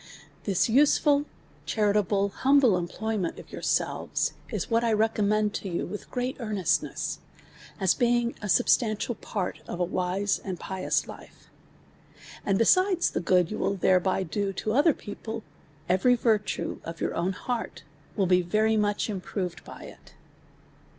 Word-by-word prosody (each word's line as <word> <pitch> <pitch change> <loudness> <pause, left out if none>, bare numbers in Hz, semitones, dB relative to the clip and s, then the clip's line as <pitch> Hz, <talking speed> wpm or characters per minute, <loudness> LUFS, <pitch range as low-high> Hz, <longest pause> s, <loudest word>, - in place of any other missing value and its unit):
This 195 -3 +2
useful, 285 +3 +4 0.4
charitable, 205 -2 +1
humble 265 -1 +4
employment 185 +2 -2
of - - -12
yourselves, - - -1 0.2
is - - -3
what 230 0 +1
I 230 - +2
recommend 215 -1 +1
to 195 - -4
you 170 - -2
with 210 - -7
great 250 +1 -3
earnestness, 210 -6 -1 0.6
as 190 -3 +3
being 240 0 +1
a 210 - -4
substantial 230 0 +2
part 200 -4 -4
of 175 - -5
a - - +2
wise 185 +3 -1
and 185 -3 -5
pious 190 -1 -1
life. - - -13 0.9
And 195 -1 +1
besides 370 - +3
the - - -1
good 180 0 +2
you 215 - -4
will 200 - 0
thereby 185 0 +2
do 195 +3 -2
to 215 +3 -2
other 290 +4 +4
people, 220 +2 -7 0.4
every 190 +8 +4
virtue 220 -3 0
of 165 0 -7
your - - -1
own 180 +3 -1
heart 240 +4 -4 0.3
will 195 - +2
be 180 0 +4
very 215 +5 +1
much 205 -1 0
improved 185 -3 -4
by - - -11
it. - - -14
210 Hz, 145 wpm, -27 LUFS, 185-230 Hz, 0.9 s, useful